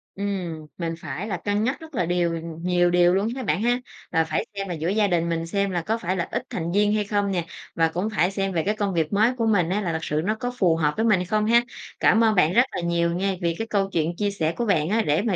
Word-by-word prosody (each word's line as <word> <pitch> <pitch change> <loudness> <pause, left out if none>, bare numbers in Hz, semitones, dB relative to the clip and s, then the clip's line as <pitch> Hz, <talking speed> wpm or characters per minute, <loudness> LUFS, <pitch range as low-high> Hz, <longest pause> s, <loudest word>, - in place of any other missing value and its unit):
Ừm, 185 -6 -4
mình 165 -2 -2
phải 160 +6 -5
là 195 -5 -2
cân 205 +3 -1
nhắc 255 +4 -1
rất 320 -3 -11
là 180 - +1
điều 175 0 +1 0.3
nhiều 175 0 +2
điều 175 0 +4
luôn 200 +3 +1
ha 265 - -4
bạn 205 - 0
ha. 245 +1 +2 0.3
Là 165 - +3
phải 155 -1 -2
xem 195 0 -3
là 180 - -3
giữa 160 +1 -3
gia 210 +1 +2
đình 170 -2 +1
mình 165 0 -2
xem 200 +2 0
là 175 -2 -1
có 220 +7 -1
phải 185 -3 -2
là 170 - -1
ít - - -2
thành 170 -1 -3
viên 205 +2 +3
hay 215 -1 +1
không 205 -1 0
nè, 175 -3 -1 0.3
và 165 0 +3
cũng 180 +6 -2
phải 180 -1 +2
xem 195 -1 -1
về 165 -2 0
cái 210 +4 0
công 205 -2 -1
việc 160 -1 0
mới 215 +5 +3
của 230 - 0
mình 190 -7 +2
á 200 +3 0
là 180 -4 -1
thật 160 - -1
sự 150 -1 -1
nó 215 +2 +1
có 245 +2 -3
phù 175 -7 +3
hợp 150 -2 +1
với 220 - +1
mình 210 -5 +4
hay 180 - -2
không 210 +2 0
ha. 235 +2 +5 0.4
Cảm 225 +1 +4
ơn 220 -1 +3
bạn 175 -2 +3
rất 240 - +6
là - - -3
nhiều 170 0 +1
nha 190 +1 0
vì 170 -1 0
cái 225 - -3
câu 195 -3 0
chuyện 165 0 0
chia 205 +2 -1
sẻ 165 -4 -1
của 240 - 0
bạn 165 -7 +1
á 225 +3 +2
để 150 -4 +1
mà 210 -3 0
190 Hz, 295 wpm, -24 LUFS, 170-210 Hz, 0.4 s, rất